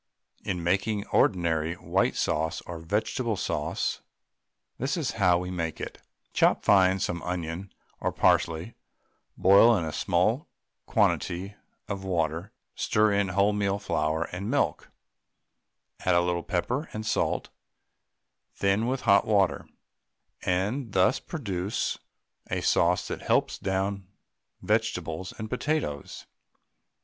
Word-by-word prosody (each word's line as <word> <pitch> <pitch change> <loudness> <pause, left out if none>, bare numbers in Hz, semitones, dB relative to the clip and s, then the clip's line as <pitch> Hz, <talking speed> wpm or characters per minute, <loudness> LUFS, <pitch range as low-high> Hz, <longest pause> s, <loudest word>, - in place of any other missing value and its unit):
In 90 -2 -3
making 100 +4 0
ordinary 85 -2 +2
white - - 0
sauce 80 +1 0
or 85 -2 -7
vegetable 105 +6 -1
sauce, - - -2 0.8
this 135 +8 -1
is 155 -6 -1
how 90 -2 +5
we 90 +1 -4
make 85 -3 -3
it; - - -7 0.3
Chop - - +3
fine 95 -1 +5
some 85 -2 -2
onion 90 +1 -4 0.3
or - - -1
parsley; 85 +6 +2 0.6
boil 100 +5 +6
in 85 - -2
a 80 - -4
small - - +1 0.4
quantity 95 +4 +1 0.3
of 100 -1 -4
water, 85 -1 -1 0.2
stir 105 -1 +2
in 100 0 +2
wholemeal 100 +1 +1
flour 80 -5 0
and 95 +4 -4
milk, 145 +3 0 1.1
add 90 - +2
a 85 - +5
little 85 0 0
pepper 105 - -2
and 110 0 -5
salt, - - 0 1.1
thin 100 +4 +1
with 130 +1 -1
hot 100 -4 +4
water, 100 -4 +2 0.7
and 100 +6 -1
thus 95 -1 +3
produce 100 - -3 0.5
a - - -1
sauce 85 +2 +2
that - - -5
helps - - +1
down 95 0 -2 0.6
vegetables 80 +3 -1
and 110 - -5
potatoes. 125 - -3
95 Hz, 120 wpm, -27 LUFS, 85-105 Hz, 1.1 s, boil